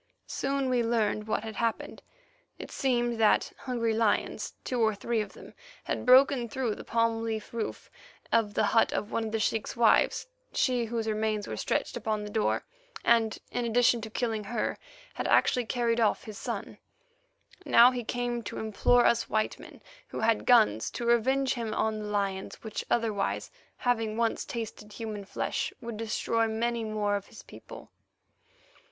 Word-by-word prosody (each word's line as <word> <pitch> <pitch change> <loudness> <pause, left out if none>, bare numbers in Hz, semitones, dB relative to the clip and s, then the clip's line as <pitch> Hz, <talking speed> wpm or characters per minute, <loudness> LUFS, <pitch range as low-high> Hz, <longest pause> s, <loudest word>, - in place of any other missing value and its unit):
Soon 275 0 -1
we 250 -1 +2
learned 220 -2 0
what 215 - -1
had 220 -2 -7
happened. 230 -1 -2 0.6
It - - -9
seemed 240 -3 0
that 215 -1 +3
hungry 235 -3 -1
lions, 220 -1 0
two 250 -2 -1
or 220 -1 +3
three 225 +2 -1
of 210 - -7
them, - - -13 0.3
had - - -3
broken 255 -1 +6
through 250 -3 -1
the - - -9
palm 230 -1 +1
leaf 225 -1 -4
roof 230 -2 -5 0.4
of 215 -3 +2
the - - +2
hut 225 - +4
of 210 - -3
one 230 - -1
of 220 - -4
the 225 - -1
sheik's 220 0 -1
wives, 235 -2 +4 0.3
she 250 -3 +1
whose 225 0 -3
remains 215 -1 -1
were - - -4
stretched - - -1
upon 215 -1 -2
the 210 - -7
door, 220 -1 0 0.4
and, 225 -2 +3
in 245 - -1
addition 235 0 +3
to 220 - -6
killing 220 -2 -2
her, 220 +2 -2 0.3
had - - -3
actually 250 -2 +3
carried 235 -1 +1
off 220 -2 +2
his 215 -4 -8
son. - - -5 0.8
Now 240 +2 +7
he 250 -1 -3
came 240 +1 -2
to - - -5
implore 220 +3 +3
us 235 0 +2
white 215 0 0
men - - -13 0.2
who - - -6
had 225 -1 +1
guns 110 - +5
to 240 - -3
revenge 260 +3 +2
him 230 -3 -3
on 220 -1 0
the 210 - -5
lions, 200 -2 -3
which 220 -1 -4
otherwise, 220 -4 0 0.3
having 225 -3 0
once 230 -1 0
tasted 215 -2 -6
human 215 -2 -6
flesh, - - -2
would 230 -2 -6
destroy 225 +1 0
many 230 +1 -1
more 210 -2 0
of 200 - -4
his - - -13
people. - - -12
225 Hz, 170 wpm, -29 LUFS, 215-240 Hz, 0.8 s, Now